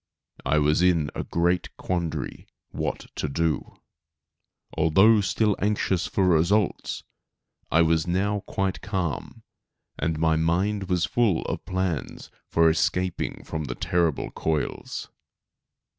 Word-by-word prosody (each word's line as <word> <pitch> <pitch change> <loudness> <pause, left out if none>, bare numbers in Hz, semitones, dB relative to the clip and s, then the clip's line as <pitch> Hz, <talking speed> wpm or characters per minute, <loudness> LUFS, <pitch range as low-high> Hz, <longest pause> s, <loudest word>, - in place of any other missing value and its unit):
I 75 +3 +3
was 75 +2 +3
in 85 -5 +3
a - - -3
great 85 +1 0
quandary 85 -3 -3 0.2
what - - -3
to 75 - -1
do. 80 +2 -1 1.0
Although 95 +8 +5
still 105 +1 +1
anxious 100 -3 +1
for 95 -2 +1
results, 90 +4 +1 0.7
I 85 +1 +5
was 80 +1 +2
now 100 +4 +1
quite 95 -1 -1
calm, 95 - -3 0.6
and 80 -1 0
my 80 0 +2
mind 95 +5 +1
was 90 -2 +2
full 110 -9 +1
of - - -4
plans 95 -5 -3 0.2
for 85 0 +4
escaping 90 +2 0
from 80 -2 -4
the 65 -2 -4
terrible 85 -4 0
coils. 80 -2 -3
85 Hz, 120 wpm, -25 LUFS, 80-95 Hz, 1.0 s, Although